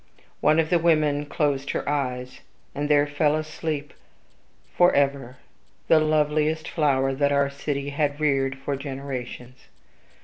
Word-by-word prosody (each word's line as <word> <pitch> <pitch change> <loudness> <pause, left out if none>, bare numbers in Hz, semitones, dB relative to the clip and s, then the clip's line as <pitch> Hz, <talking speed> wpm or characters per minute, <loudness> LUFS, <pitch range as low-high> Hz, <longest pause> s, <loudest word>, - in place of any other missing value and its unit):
One 155 +1 +3
of 160 -1 +1
the 175 - +4
women 155 -3 +2
closed 140 -2 -1
her - - -3
eyelids; 130 -3 -3 0.3
and 145 +1 -3
there 145 -1 +4
fell 145 +1 +1
asleep 155 -1 -4 0.8
forever 140 -7 +2 0.5
the 160 - +6
loveliest 155 0 +1
flower 135 -4 +1
that 140 +1 +1
our 140 0 +2
city 140 0 -3
had 145 0 -1
reared 135 -3 +1
for 140 +1 -3
generations. 130 -2 -7
145 Hz, 130 wpm, -24 LUFS, 135-155 Hz, 0.8 s, the